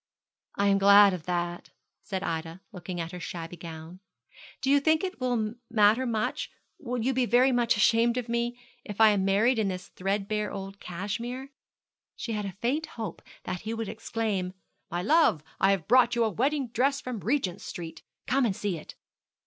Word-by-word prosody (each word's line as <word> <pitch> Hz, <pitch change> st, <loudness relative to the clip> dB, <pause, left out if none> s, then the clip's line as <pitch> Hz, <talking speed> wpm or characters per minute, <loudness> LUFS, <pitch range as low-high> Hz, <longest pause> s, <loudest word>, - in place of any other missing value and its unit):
'I 200 Hz, -, +1 dB
am 200 Hz, 0 st, +4 dB
glad 200 Hz, 0 st, +7 dB
of 175 Hz, -3 st, -6 dB
that,' 175 Hz, -1 st, -2 dB, 0.3 s
said 190 Hz, -1 st, -4 dB
Ida, 165 Hz, +1 st, -4 dB
looking 180 Hz, -2 st, -6 dB
at 165 Hz, 0 st, -4 dB
her 180 Hz, -, -7 dB
shabby 170 Hz, 0 st, -6 dB
gown. 165 Hz, +1 st, -9 dB, 0.6 s
'Do 270 Hz, -, +1 dB
you 285 Hz, -, +6 dB
think 315 Hz, +3 st, +2 dB
it 370 Hz, -7 st, -4 dB
will 235 Hz, -4 st, 0 dB, 0.2 s
matter 225 Hz, +2 st, +4 dB
much 220 Hz, -2 st, -1 dB, 0.3 s
will 250 Hz, -3 st, -3 dB
you 265 Hz, +3 st, +1 dB
be 250 Hz, -1 st, +1 dB
very 250 Hz, +4 st, +5 dB
much 240 Hz, -3 st, +2 dB
ashamed 230 Hz, +3 st, +3 dB
of 245 Hz, -1 st, -2 dB
me, 235 Hz, +1 st, -1 dB, 0.3 s
if 205 Hz, -1 st, -8 dB
I 220 Hz, -1 st, +8 dB
am 205 Hz, -2 st, +2 dB
married 220 Hz, +5 st, +3 dB
in 215 Hz, -, +1 dB
this 185 Hz, -1 st, -5 dB
threadbare 200 Hz, +2 st, -2 dB
old 195 Hz, 0 st, -7 dB
cashmere?' 235 Hz, +9 st, -5 dB, 0.6 s
She 230 Hz, -, -5 dB
had 210 Hz, -2 st, -2 dB
a 195 Hz, -, -5 dB
faint 295 Hz, +7 st, 0 dB
hope 225 Hz, -2 st, -5 dB, 0.2 s
that 180 Hz, -, -4 dB
he 220 Hz, +1 st, -4 dB
would 225 Hz, -2 st, -4 dB
exclaim, 215 Hz, -5 st, -2 dB, 0.4 s
'My 175 Hz, +1 st, -2 dB
love, 225 Hz, -, +4 dB, 0.2 s
I 195 Hz, -, +4 dB
have 195 Hz, -5 st, +1 dB
brought 245 Hz, 0 st, +5 dB
you 235 Hz, -, +3 dB
a 220 Hz, -, +1 dB
wedding 270 Hz, -, 0 dB
dress 270 Hz, +4 st, +1 dB
from 250 Hz, -3 st, -5 dB
Regent 220 Hz, -6 st, -1 dB
Street; 165 Hz, -2 st, -7 dB, 0.2 s
come 270 Hz, +2 st, +2 dB
and 215 Hz, -6 st, +1 dB
see 190 Hz, -5 st, -2 dB
it.' -, -, -12 dB
215 Hz, 190 wpm, -28 LUFS, 185-245 Hz, 0.6 s, I